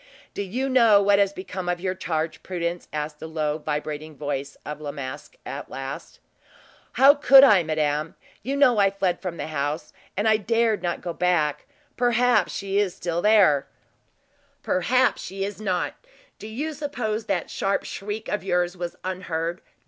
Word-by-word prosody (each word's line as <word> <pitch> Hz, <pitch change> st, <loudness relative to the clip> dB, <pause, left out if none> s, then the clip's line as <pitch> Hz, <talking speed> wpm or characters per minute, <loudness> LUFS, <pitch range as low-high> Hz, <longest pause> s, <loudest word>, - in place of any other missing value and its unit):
"Do -, -, -3 dB
you 240 Hz, +8 st, -2 dB
know 230 Hz, -6 st, +6 dB
what 200 Hz, 0 st, +4 dB
has 200 Hz, -1 st, +3 dB
become 185 Hz, -1 st, -5 dB
of 175 Hz, 0 st, -1 dB
your 185 Hz, +1 st, -1 dB
charge, 160 Hz, -4 st, -3 dB
Prudence?" 175 Hz, -1 st, -4 dB
asked 150 Hz, 0 st, -4 dB
the -, -, -7 dB
low, 155 Hz, -1 st, -2 dB
vibrating 150 Hz, 0 st, -4 dB
voice 140 Hz, -1 st, -4 dB
of 150 Hz, 0 st, -6 dB
La 145 Hz, -, -5 dB
Masque, 140 Hz, 0 st, -8 dB
at 140 Hz, +1 st, -6 dB
last. 135 Hz, +1 st, -7 dB, 0.7 s
"How 275 Hz, +2 st, +7 dB
could 275 Hz, -2 st, +7 dB
I, 210 Hz, -9 st, +7 dB
madame? 155 Hz, -1 st, -1 dB, 0.3 s
You 270 Hz, +5 st, -2 dB
know 255 Hz, -6 st, +5 dB
I 200 Hz, -1 st, +5 dB
fled 195 Hz, -2 st, -1 dB
from 175 Hz, -2 st, -5 dB
the -, -, -4 dB
house, 150 Hz, 0 st, -3 dB, 0.2 s
and 205 Hz, +2 st, +1 dB
I 220 Hz, 0 st, +5 dB
dared 225 Hz, 0 st, +1 dB
not 175 Hz, -, -2 dB
go 175 Hz, -1 st, -4 dB
back. 165 Hz, -5 st, 0 dB, 0.3 s
Perhaps 245 Hz, 0 st, +3 dB
she 195 Hz, 0 st, -1 dB
is 200 Hz, -4 st, 0 dB
there 175 Hz, -3 st, +3 dB
still." -, -, -38 dB, 0.9 s
"Perhaps 250 Hz, +8 st, +2 dB
she 195 Hz, +1 st, -5 dB
is 205 Hz, +1 st, -5 dB
not? 185 Hz, -4 st, -1 dB, 0.5 s
Do 215 Hz, -, -8 dB
you 290 Hz, +9 st, -4 dB
suppose 245 Hz, -7 st, -3 dB
that 185 Hz, -4 st, -2 dB
sharp 200 Hz, -, 0 dB
shriek 210 Hz, +2 st, -6 dB
of 210 Hz, -, -2 dB
yours 180 Hz, -1 st, 0 dB
was 175 Hz, -1 st, -5 dB
unheard? 175 Hz, -2 st, -3 dB
185 Hz, 170 wpm, -24 LUFS, 155-215 Hz, 0.9 s, How